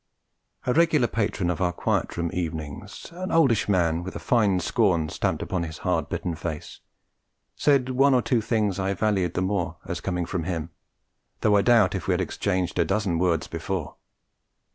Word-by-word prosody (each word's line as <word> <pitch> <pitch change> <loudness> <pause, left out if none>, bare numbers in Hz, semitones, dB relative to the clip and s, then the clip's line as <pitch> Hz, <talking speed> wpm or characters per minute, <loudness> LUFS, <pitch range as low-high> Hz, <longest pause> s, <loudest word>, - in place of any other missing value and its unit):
A 125 - +2
regular 160 -4 +4
patron 100 -5 -1
of 85 - -4
our 90 -1 +2
Quiet - - -1
Room 85 -1 -1
Evenings, 80 -5 -5
an 185 +2 -5
oldish 135 -11 +3
man 85 -4 +2
with 95 +2 -7
a - - -4
fine 105 -6 +2
scorn 90 -6 +1
stamped - - -1
upon 95 -2 -2
his 80 -2 -5
hard - - 0
bitten 90 - -2
face, 80 -2 -6 0.8
said 140 -3 +2
one 135 +1 +4
or 125 - +2
two 120 -4 +1
things 105 -4 0
I 95 0 0
valued 95 -4 0
the 90 - +1
more 95 -4 -1
as 85 0 -4
coming 90 -2 -2
from 85 -2 -3
him, 85 -2 -3 0.7
though 105 -1 +4
I 100 - +5
doubt 110 -4 +4
if 95 - -4
we 95 - +3
had 90 - 0
exchanged 95 0 -1
a - - +5
dozen 95 -6 0
words 85 -3 +1
before. 85 0 -4
95 Hz, 185 wpm, -25 LUFS, 85-110 Hz, 0.8 s, I